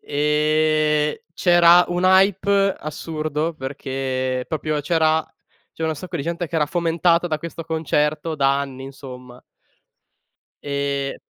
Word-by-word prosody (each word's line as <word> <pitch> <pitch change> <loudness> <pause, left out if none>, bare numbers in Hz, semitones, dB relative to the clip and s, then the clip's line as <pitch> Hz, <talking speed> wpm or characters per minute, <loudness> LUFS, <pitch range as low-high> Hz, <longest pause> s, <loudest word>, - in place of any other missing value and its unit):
ehm, 150 +1 +1 0.2
c'era 175 0 +6
un 175 +1 -1
hype 195 +1 +3
assurdo, 155 +1 -4
perché 130 -2 -3
proprio 155 -1 -2
c'era 160 +1 +1 0.4
c'era 160 0 -3
un - - -2
sacco 175 +2 -6
di 140 - -3
gente 170 +2 -3
che 165 - -12
era 155 -2 +3
fomentata 170 +1 +1
da 155 -2 -2
questo 165 0 -7
concerto 155 -1 -1
da 140 0 +2
anni, 135 -1 -7
insomma. 125 -2 -11 1.2
E 140 -1 -2
155 Hz, 120 wpm, -21 LUFS, 140-170 Hz, 1.2 s, c'era